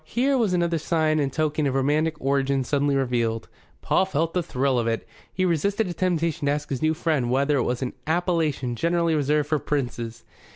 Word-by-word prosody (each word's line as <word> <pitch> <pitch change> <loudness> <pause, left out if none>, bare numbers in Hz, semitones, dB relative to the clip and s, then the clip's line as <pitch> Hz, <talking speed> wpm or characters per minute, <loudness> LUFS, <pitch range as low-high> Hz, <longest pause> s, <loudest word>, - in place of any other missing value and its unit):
Here 255 - +1
was 225 -7 +2
another 170 -2 +1
sign 155 -1 +1
and 140 -2 0
token 155 0 0
of 135 - -1
romantic 150 +4 +1
origin 135 0 +1
suddenly 140 +2 +1
revealed. 120 -4 0 0.4
Paul 190 - +2
felt 165 -2 -1
the 180 - +1
thrill 135 -5 0
of 115 - -1
it. 115 -1 -2 0.2
He 185 - 0
resisted 200 +5 +1
a 175 - -3
temptation 165 -4 0
to - - +3
ask 145 0 -3
his 130 - -2
new 155 0 +2
friend 155 -7 0
whether 140 +3 +2
it - - +2
was 125 +2 -1
an 125 - -3
appellation 160 -7 0
generally 170 +4 +1
reserved 150 0 +1
for 155 -1 +2
princes. 120 -6 -3
150 Hz, 200 wpm, -24 LUFS, 135-165 Hz, 0.4 s, to